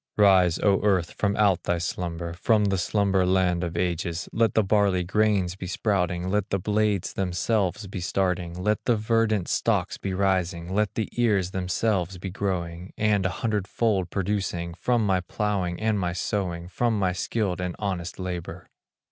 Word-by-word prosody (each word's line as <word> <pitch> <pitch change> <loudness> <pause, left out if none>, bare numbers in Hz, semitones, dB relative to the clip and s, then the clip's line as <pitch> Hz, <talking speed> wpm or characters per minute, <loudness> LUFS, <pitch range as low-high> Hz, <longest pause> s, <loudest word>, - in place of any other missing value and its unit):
Rise, 95 -4 +5
O 100 -2 +2
earth, 95 -5 +1
from 100 -1 0
out 100 -4 +3
thy 85 - 0
slumber, 85 -1 -3
From 105 +4 +2
the 95 -2 +1
slumber 95 +2 +2
land 90 -1 +2
of 85 -1 -3
ages, 85 0 -1
Let 115 -3 +2
the 110 - +4
barley 100 -2 +2
grains 100 -1 +1
be 95 -1 -7
sprouting, 90 -2 0
Let 105 0 0
the 95 - +1
blades 105 -1 0
themselves 95 +2 0
be 95 -1 -6
starting, 90 -2 -1
Let 105 +4 -1
the 120 - +3
verdant 110 -3 +1
stalks - - 0
be 95 -1 -3
rising, 90 -2 0
Let 105 0 0
the 110 - -1
ears 100 -6 +2
themselves 95 0 -1
be 95 +1 -6
growing, 90 -2 -3
And 105 -3 +2
a 90 -1 -5
hundredfold 105 -2 0
producing, 95 -3 -2
From 120 +4 +1
my 95 -2 +2
plowing 90 -1 -2
and 110 -1 +1
my 90 -2 -1
sowing, 90 -2 -2
From 115 +5 0
my 95 -2 +1
skilled 90 0 -2
and 90 -1 -3
honest 90 -4 -3
labor. 90 -1 -6
95 Hz, 165 wpm, -26 LUFS, 90-105 Hz, -, Rise